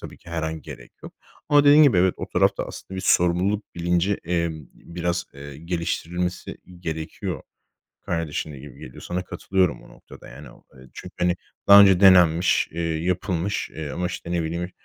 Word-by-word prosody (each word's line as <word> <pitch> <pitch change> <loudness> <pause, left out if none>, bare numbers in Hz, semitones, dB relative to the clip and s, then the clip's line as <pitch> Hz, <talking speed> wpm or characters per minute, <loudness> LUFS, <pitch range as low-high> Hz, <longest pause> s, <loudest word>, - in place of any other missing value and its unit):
tabii - - -10
ki 85 - -15
her 85 -1 -3
an 80 -1 -4
gerek - - -11
yok - - -10 0.4
ama 145 -1 +5
dediğin 145 +2 +7
gibi 140 -10 +5
evet 90 0 +3
o - - -6
tarafta - - +1
aslında 95 - -9
bir - - -3
sorumluluk 90 +5 +1
bilinci, 85 +3 0
eee, 85 0 0 0.3
biraz, 85 0 -4
eee, 70 0 -10
geliştirilmesi 85 +1 -4 0.2
gerekiyor. 80 -2 -5 0.6
Kardeşin 80 -2 -3
de 70 - -10
gibi 70 -1 -13
geliyor. 60 - -11
Sana 90 +1 -3
katılıyorum 95 -1 -1
bu - - -17
noktada. - - -15
Yani, 70 +5 -12
o, - - -20
eee, 65 0 -16
çünkü, - - -11
hani, 90 0 +1 0.3
daha 100 0 +10
önce 95 -3 +6
denenmiş, 90 -3 +5
eee, 85 - -6
yapılmış, 85 +3 -2
eee, 80 -2 -7
ama, 90 +3 -3
işte, 85 -1 -6
ne 85 -1 0
bileyim, 85 +3 -4
85 Hz, 180 wpm, -23 LUFS, 80-90 Hz, 0.6 s, daha